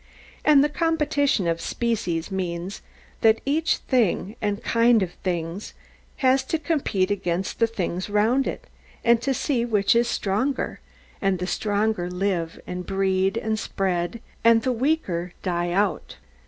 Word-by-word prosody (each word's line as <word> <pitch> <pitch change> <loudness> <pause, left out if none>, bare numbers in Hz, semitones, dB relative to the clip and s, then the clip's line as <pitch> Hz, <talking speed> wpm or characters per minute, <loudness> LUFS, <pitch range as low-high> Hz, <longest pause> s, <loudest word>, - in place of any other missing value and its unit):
And 290 -2 +6
the - - +3
competition 295 - +1
of 165 0 0
species 195 -8 -2
means, 180 0 -4 0.4
that 225 0 +5
each 310 +3 +1
thing, 225 -4 0
and 205 0 -2
kind 230 -2 +4
of 180 - -4
things, 175 +1 -3 0.5
has 260 +1 +4
to 320 - 0
compete 285 - 0
against 185 -2 -2
the 230 - +4
things 185 -4 -3
round 220 +6 +2
it; - - -5 0.4
and 235 0 +5
to 275 - 0
see 260 -2 0
which 220 -1 +2
is 235 0 +3
the - - -1
stronger; 230 +8 -1 0.4
and 195 -1 +2
the 180 - -3
stronger 205 -1 0
live, 180 -3 -2
and 180 0 -5
breed, 190 0 +1
and 220 0 -1
spread, 185 +3 -2 0.2
and 230 -1 +5
the 260 - +1
weaker 225 - -1
die 175 -2 -1
out. 195 +2 0
205 Hz, 150 wpm, -24 LUFS, 185-240 Hz, 0.5 s, And